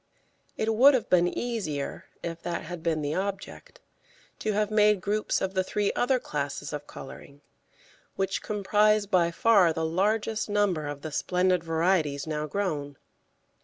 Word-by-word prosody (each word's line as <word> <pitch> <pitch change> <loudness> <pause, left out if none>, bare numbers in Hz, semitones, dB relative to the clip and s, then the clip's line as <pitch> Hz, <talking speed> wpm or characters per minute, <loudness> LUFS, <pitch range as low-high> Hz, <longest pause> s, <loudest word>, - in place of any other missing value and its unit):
It 220 0 0
would 265 +5 +7
have 245 - -2
been 175 -1 +5
easier, 180 -11 -3 0.2
if 165 0 -5
that 170 0 -3
had 170 +1 -7
been 160 -2 -1
the 145 +1 -1
object, 195 +1 -5 0.6
to 215 - -1
have 210 +1 0
made 210 -1 +4
groups 210 +3 -1
of 190 0 -2
the 190 -1 +1
three 205 +2 -1
other 255 +1 +2
classes 145 - -4
of 145 0 -6
colouring, 140 +1 -11 0.7
which 195 0 -1
comprise 210 +1 +2
by 180 -4 +2
far 190 -1 +4
the 160 0 -2
largest 210 +6 0
number 200 -7 +1
of 145 -1 -6
the 155 - -5
splendid 180 +2 +1
varieties 165 -3 +1
now 155 -1 -3
grown. 150 -6 -3
185 Hz, 155 wpm, -27 LUFS, 155-210 Hz, 0.7 s, would